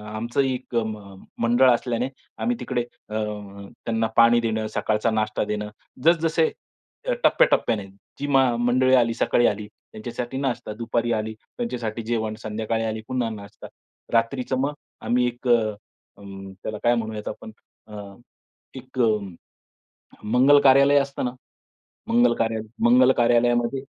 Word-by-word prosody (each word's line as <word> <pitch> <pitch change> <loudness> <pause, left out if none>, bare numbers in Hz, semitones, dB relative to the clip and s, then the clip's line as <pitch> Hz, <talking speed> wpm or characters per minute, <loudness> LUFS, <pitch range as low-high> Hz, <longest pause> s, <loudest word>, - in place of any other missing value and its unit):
आमचं 120 +5 -1
एक 130 -2 -3 0.6
मंडळ 120 +3 +4
असल्याने, 120 +1 0 0.3
आम्ही 245 +1 0
तिकडे 125 -2 -1 0.3
अ, 105 - -5 0.7
त्यांना 115 -1 0
पाणी 115 0 +6
देणं, 110 -1 -1
सकाळचा 110 +1 0
नाश्ता 110 -1 0
देणं 105 0 -3 0.4
जसं 170 0 +5
जसे, 160 0 +2 0.6
अ, - - +2
टप्प्याटप्प्याने 110 - +3 0.3
जी 145 - -3
मं 135 -3 +3
मंडळी 130 +1 +3
आली, 115 -2 +3
सकाळी 120 +1 +2
आली 105 0 -2 0.3
त्यांच्यासाठी 120 +3 -5
नाश्ता, 130 -5 -2
दुपारी 115 +1 -1
आली 110 0 -2
त्यांच्यासाठी 115 - -5
जेवण, 110 -1 -2
संध्याकाळी 110 +1 -2
आली 110 0 -3
पुन्हा 125 -3 -1
नाश्ता. 100 -1 -10 0.5
रात्रीचं 125 +3 +1
मग 145 +2 0 0.3
आम्ही 125 +1 +1
एक 120 +1 -6
अ, - - +6 0.7
अ, 100 - -16 0.4
त्याला 110 - -4
काय 120 0 +4
म्हणू 110 -1 -3
यात 105 - -7
आपण 110 +1 -9 0.4
अ, 105 -1 -8 0.7
एक 130 0 -9
अ, 115 -2 +4 1.1
मंगल 130 +6 +5
कार्यालय 140 +1 +6
असतं 140 -1 -3
ना, 125 - -1 0.8
मंगल 240 +1 +4
कार्यालय 110 -1 -1 0.2
मंगल 250 +2 +6
कार्यालयामध्ये 120 +2 +2
120 Hz, 140 wpm, -24 LUFS, 110-130 Hz, 1.1 s, पाणी